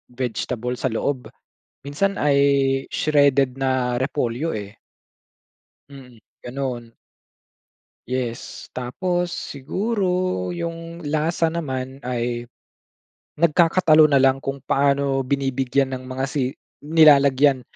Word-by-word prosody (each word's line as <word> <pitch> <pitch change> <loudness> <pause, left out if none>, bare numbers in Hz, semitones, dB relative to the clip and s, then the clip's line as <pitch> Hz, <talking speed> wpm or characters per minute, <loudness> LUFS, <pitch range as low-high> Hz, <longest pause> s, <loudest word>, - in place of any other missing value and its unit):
vegetable 125 0 -3
sa - - 0
loob, 125 +1 -2 0.6
minsan 150 +9 -1
ay 145 -1 +3 0.5
shredded 140 -3 +2
na 130 -2 0
repolyo, 130 +2 -2
eh. 105 0 -6 1.1
Mm, 125 -5 -14 0.2
ganun. 120 -3 -5 1.1
Yes! 125 -2 -5
Tapos, 175 +8 -2
siguro 190 - -3 0.5
yung 165 0 -6
lasa 160 +2 0
naman 135 -5 -4
ay, 120 -1 -3 0.9
nagkakatalo 160 -1 +4
na 140 - +5
lang 135 0 +3
kung 135 0 -3
paano 140 0 +1
binibigyan 135 0 0
ng 130 - -6
mga 130 +1 -4
si 135 -2 -1 0.3
nilalagyan 145 -3 +5
135 Hz, 95 wpm, -22 LUFS, 125-150 Hz, 1.1 s, na